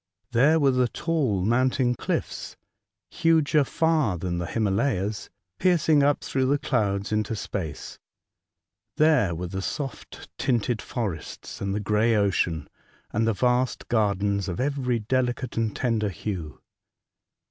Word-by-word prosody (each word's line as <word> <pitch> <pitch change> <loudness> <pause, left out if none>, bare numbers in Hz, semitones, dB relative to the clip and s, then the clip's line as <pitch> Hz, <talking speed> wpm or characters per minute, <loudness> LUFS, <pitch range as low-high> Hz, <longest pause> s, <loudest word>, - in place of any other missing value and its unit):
There 140 +7 +4
were 140 -2 +4
the 125 -1 +2
tall 135 - -1
mountain 125 +2 +2
cliffs, - - -4 0.5
huger 155 -2 +3
far 155 - +1
than 85 0 -3
the 85 - -3
Himalayas, 100 - -1 0.3
piercing 160 -5 +4
up 145 +1 +2
through 130 -1 0
the 140 +2 +3
clouds 100 -8 -1
into 110 +1 0
space; 95 -6 -5 1.0
there 150 - +4
were 90 +2 -4
the 95 +2 -4
soft, 135 +7 -6
tinted 120 -2 0
forests, 105 - -5
and 100 0 -1
the - - 0
grey 105 +3 +2
ocean, 90 -6 +1 0.5
and 110 +1 +1
the 115 - +3
vast 125 +4 0
gardens 100 -3 +1
of 90 - -4
every 130 -2 0
delicate 125 +2 -1
and 115 -2 -1
tender 115 -4 0
hue. 90 -5 -5
115 Hz, 130 wpm, -25 LUFS, 100-135 Hz, 1.0 s, There